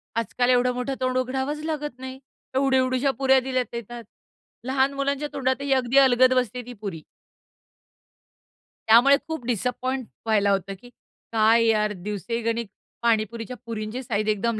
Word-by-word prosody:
आजकाल 245 +2 0
एवढं 250 0 +3
मोठं 250 +2 -3
तोंड 255 0 0
उघडावच 265 +3 -2
लागत 295 -5 -4
नाही. 260 0 -8 0.4
एवढी 265 0 +3
एवढुशा 255 +1 +1
पुऱ्या 265 -1 +5
दिल्या 255 0 -1
येतात. 235 0 -7 0.6
लहान 265 +1 +1
मुलांच्या 280 +1 -1
तोंडातही 270 +1 -1
अगदी 260 0 +1
अलगद 255 -1 +6
बसते 250 -1 0
ती 245 - -8
पुरी. 185 -6 -5 1.9
त्यामुळे 240 +5 +7
खूप 320 -7 -5
डिसअपॉइंट 250 +2 -2 0.2
व्हायला 210 -2 +2
होतं, 195 0 -1
की 245 - -14 0.4
काय 225 +1 +4
यार 215 -1 +2
दिवसेगणीक 225 +4 -3 0.3
पाणीपुरीच्या 230 +1 -1
पुरींची 225 +2 -5
साइझ 215 -3 -2
एकदम 215 +1 0
250 Hz, 135 wpm, -24 LUFS, 225-265 Hz, 1.9 s, त्यामुळे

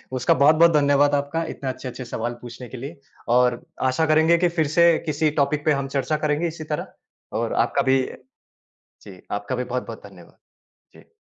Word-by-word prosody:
उसका 125 - +2
बहुत-बहुत 155 +5 +5
धन्यवाद 145 0 +3
आपका 145 +4 -1
इतने 135 - -5
अच्छे-अच्छे 130 0 -6
सवाल 120 0 -4
पूछने 120 +1 -9
के 130 - -8
लिए 140 +5 -8 0.4
और 125 -1 +2 0.3
आशा 160 +5 +1
करेंगे 160 +2 +4
कि 175 0 +2
फिर 155 -2 +2
से 170 +3 +3 0.2
किसी 155 0 +1
टॉपिक 145 +1 0
पे 155 - +4
हम 140 -1 -1
चर्चा 150 +3 0
करेंगे 150 +3 0
इसी 160 -1 -7
तरह। 150 -1 -5 0.5
और - - -2
आपका - - +1
भी 130 0 +3 0.8
जी, 95 -3 -16
आपका 100 +5 -3
भी 125 - -2
बहुत-बहुत 125 -3 -5
धन्यवाद। 90 -4 -17 0.6
जी। - - -26
140 Hz, 175 wpm, -23 LUFS, 125-155 Hz, 0.8 s, बहुत-बहुत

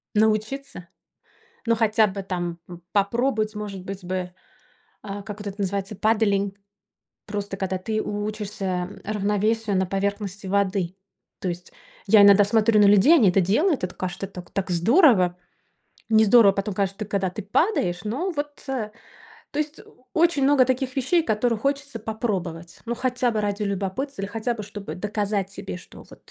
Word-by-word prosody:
Научиться? 215 0 0 0.8
Ну, 230 0 +3
хотя 220 -1 +3
бы 195 0 -5
там 175 -2 -3
п 175 -1 -9
попробовать, 215 +1 +1
может 200 -3 -6
быть 195 -1 -6
бы, 185 +1 -3 0.9
э, 200 0 -6
как 210 -1 -7
вот 205 - -6
это 195 - -5
называется, 195 +1 -2
paddling, 200 -2 +1 0.7
просто 205 -2 -4
когда 190 -1 -2
ты 215 +3 -2
учишься 205 -3 -3 0.2
равновесию 210 +1 0
на 190 0 +1
поверхности 200 0 -3
воды. 195 -2 0 0.4
То 185 - -2
есть 175 +1 -6 0.3
я 205 0 +7
иногда 200 0 +8
смотрю 215 0 +3
на 205 - +7
людей, 205 - +6
они 220 -10 +5
это 195 - +3
делают, 260 - +2
это, 180 - -5
кажется, 185 +1 -4
так 180 -2 -11
так 195 -1 -2
здорово. 185 - +4 0.7
Не 220 0 +5
здорово 210 -2 +7
потом, 195 0 -2
каж 195 -1 0 0.2
когда 195 -2 0
ты 210 +4 -6
падаешь, 195 - +1
но 280 - -2
вот, 290 -1 -5
э, 235 -6 -3 0.6
то 290 - -5
есть 300 0 -3 0.3
очень 330 -4 +3
много 275 -2 +5
таких 260 0 -1
вещей, 320 +6 +2
которые 225 -1 0
хочется 280 -1 -2
попробовать. 185 -7 -4
Ну, 235 - -1
хотя 250 0 0
бы 215 -2 -1
ради 205 0 -2
любопытства 200 +6 -3
или 195 - -3
хотя 225 +3 -2
бы 215 - -6
чтобы 205 -1 -7
доказать 205 0 -2
себе, 195 -2 -7
что - - -15
вот - - -17
205 Hz, 160 wpm, -24 LUFS, 195-230 Hz, 0.9 s, иногда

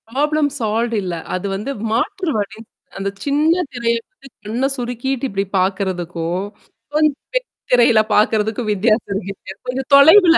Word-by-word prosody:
Problem 295 +4 +1
solved 230 +1 0
இல்ல. 180 -2 -3 0.2
அது 185 - -4
வந்து 210 +8 -3 0.2
மாற்று 320 - 0
வழி. 205 +1 -3 0.4
அந்தச் 200 0 -4
சின்ன 310 +5 +2
திரைய 235 -1 0 0.5
கண்ணை 235 +6 0
சுருக்கிட்டு 245 +2 -2
இப்பிடி 195 -4 -2
பாக்குறதுக்கும், 180 -2 -1 0.5
கொஞ்சம் 305 -2 +3 0.2
பெரிய - - 0 0.3
திரையில 235 -2 +6
பாக்குறதுக்கும் 215 +1 +2
வித்தியாசம் 210 -1 +1
இருக்கு. 195 -1 -8 0.2
கொஞ்சம் 260 +1 -3
தொலைவுல. 330 +5 +8
230 Hz, 125 wpm, -19 LUFS, 200-275 Hz, 0.5 s, தொலைவுல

